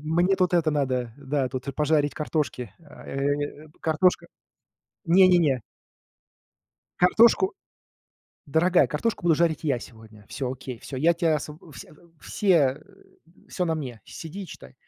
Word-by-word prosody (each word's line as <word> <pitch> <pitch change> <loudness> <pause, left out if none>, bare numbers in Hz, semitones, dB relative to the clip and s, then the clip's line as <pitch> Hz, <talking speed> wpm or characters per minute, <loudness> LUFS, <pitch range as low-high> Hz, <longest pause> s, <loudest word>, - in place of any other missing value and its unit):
мне 180 +3 +3
тут 180 -1 +1
это 165 -3 +2
надо, 130 -5 -1
да, 140 -1 -1
тут, 130 +1 -6
э, - - -2
пожарить 150 0 +1
картошки. 150 - -3
Э, 145 0 -4
п - - -27
картошка 160 +3 +1 0.8
Не 185 +3 +6
не 180 -1 +5
не. 140 -7 +1 1.4
Картошку? 230 - +4 0.9
Дорогая, 170 +5 +3
картошку 175 +7 -2
буду 165 -3 +4
жарить 165 -1 0
я 135 -6 0
сегодня. 110 -3 -14
Всё 130 -2 -4
окей, 130 -2 -8
всё 130 - -7
я 165 +5 +3
тебя 165 -2 +1
освоб 150 +1 -7
э, 160 - -15
вс 120 - -10
э, - - -20 0.3
все, 205 - -3
э, 135 -3 +2 0.7
всё 180 - -2
на 160 - 0
мне, 125 -8 -6
сиди 185 +5 -8
и - - -11
читай. - - -12
150 Hz, 155 wpm, -25 LUFS, 135-170 Hz, 1.4 s, Не